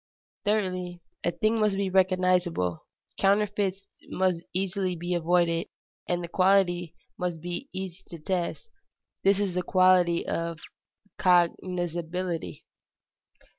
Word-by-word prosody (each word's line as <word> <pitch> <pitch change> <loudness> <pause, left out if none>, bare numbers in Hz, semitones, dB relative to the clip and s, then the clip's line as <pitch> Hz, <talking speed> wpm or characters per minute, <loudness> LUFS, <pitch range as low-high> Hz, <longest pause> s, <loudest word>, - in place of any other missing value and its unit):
Thirdly, 185 -4 -1 0.2
a - - +2
thing 215 +5 +1
must 210 -2 +2
be 200 0 0
recognizable; 180 - +1 0.3
counterfeits 200 -1 +1 0.2
must 185 -2 +1
be - - -22
easily 190 -2 -2 0.2
avoided, 170 0 +2 0.4
and 175 0 -1
the - - -4
quality 175 -2 +2 0.2
must 180 -2 -2
be 175 - -5
easy 185 -1 -6
to 170 - -8
test: 180 - -3 0.5
this 195 0 +4
is 200 -3 0
the 180 - 0
quality 180 -1 +3
of 170 -1 -2 0.6
cognizability. 175 - 0
180 Hz, 110 wpm, -27 LUFS, 175-190 Hz, 0.6 s, this